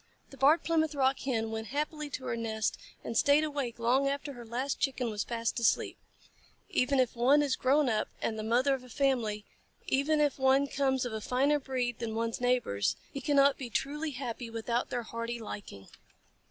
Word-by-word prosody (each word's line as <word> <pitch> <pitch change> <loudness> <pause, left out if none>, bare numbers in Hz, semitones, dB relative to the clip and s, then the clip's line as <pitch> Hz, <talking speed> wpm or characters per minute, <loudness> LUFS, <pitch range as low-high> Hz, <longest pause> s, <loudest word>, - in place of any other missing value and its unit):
The 275 - -12
Barred 295 +5 +5
Plymouth 315 -2 +1
Rock 270 -1 +2
Hen 225 -4 -1
went 220 0 -4
happily 300 +2 -3
to 260 -2 -6
her - - -1
nest, 220 -2 -1 0.3
and 230 - -5
stayed 285 +6 +5
awake 280 -6 -3
long 250 +4 +2
after 280 +1 -3
her 240 -2 -9
last 255 +4 -2
Chicken 255 -4 -1
was 210 -1 -2
fast 230 0 -2
asleep. 235 - +2 0.7
Even 270 +1 +2
if 250 -2 +1
one 270 +5 +4
is 275 -3 +1
grown 280 +2 +3
up 215 -3 +1
and 220 - -2
the 215 - -4
mother 245 +5 +2
of 265 -2 -3
a 250 - -14
family, 230 -5 0 0.4
even 290 +3 +2
if 290 -2 +1
one 265 +1 +4
comes 265 -2 0
of 245 - -4
a 220 - -3
finer 275 +6 +2
breed 250 -3 -2
than 225 -2 -3
one's 230 +1 -2
neighbors, 245 - +1 0.2
he 275 - -4
cannot 280 -2 +4
be 255 -3 -5
truly 295 +7 -2
happy 250 -3 -5
without 230 +2 -2
their 245 -1 -2
hearty 230 +1 -4
liking. 200 - -8
255 Hz, 195 wpm, -30 LUFS, 230-280 Hz, 0.7 s, Barred